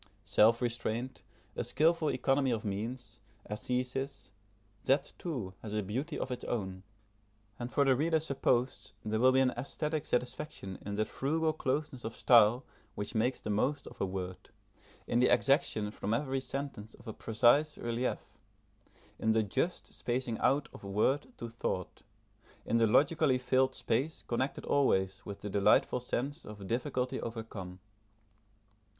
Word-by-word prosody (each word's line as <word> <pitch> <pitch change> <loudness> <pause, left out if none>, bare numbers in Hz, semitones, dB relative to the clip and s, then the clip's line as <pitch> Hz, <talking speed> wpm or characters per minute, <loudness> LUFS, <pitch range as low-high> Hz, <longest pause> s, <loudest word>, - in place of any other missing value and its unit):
Self 115 +3 +4
restraint, 120 +1 -2 0.3
a - - -1
skilful 160 0 +2
economy 135 +1 +2
of 115 -2 -1
means, 115 +6 -4 0.3
ascêsis, 125 +3 -3 0.5
that 140 +1 +2
too 125 - -4
has 105 -1 -5
a 105 - 0
beauty 120 +10 -3
of 130 - -3
its 125 - -4
own; 95 -5 -3 0.8
and 120 +1 -4
for 140 - +3
the 135 -1 +5
reader 160 +4 +2
supposed 135 -6 0
there 110 +1 0
will 130 +2 +6
be 130 0 +4
an 130 -1 +3
aesthetic 150 +5 -3
satisfaction 125 -5 -3
in 100 0 -4
that 110 0 0
frugal 155 +3 0
closeness 145 -2 -2
of 115 +1 -5
style 120 +1 +5 0.3
which 105 +2 -3
makes 125 +3 +1
the 105 - -3
most 130 +8 0
of - - -10
a - - +3
word, 95 -1 -5 0.6
in 120 - +1
the 125 - +4
exaction 135 -8 +3
from 105 +1 -1
every 135 +1 -1
sentence 130 -5 -5
of 115 - -17
a 110 - -4
precise 120 +9 +3
relief, 120 +2 -3 0.8
in 110 - +2
the 110 0 +3
just 165 - -2
spacing 120 -2 -2
out 145 +2 +2
of - - -12
word 105 +9 +1
to 120 - -5
thought, 115 -6 -4 0.6
in 115 - +2
the 115 -1 +4
logically 140 +3 +4
filled 130 +1 +2
space 130 +8 -1
connected 130 +3 -2
always 95 -9 +2
with 100 - -7
the 105 - -4
delightful 105 +5 +4
sense 135 +5 -3
of 105 -2 -9
difficulty 125 +4 -1
overcome. 110 -5 -6
125 Hz, 150 wpm, -32 LUFS, 110-135 Hz, 0.8 s, will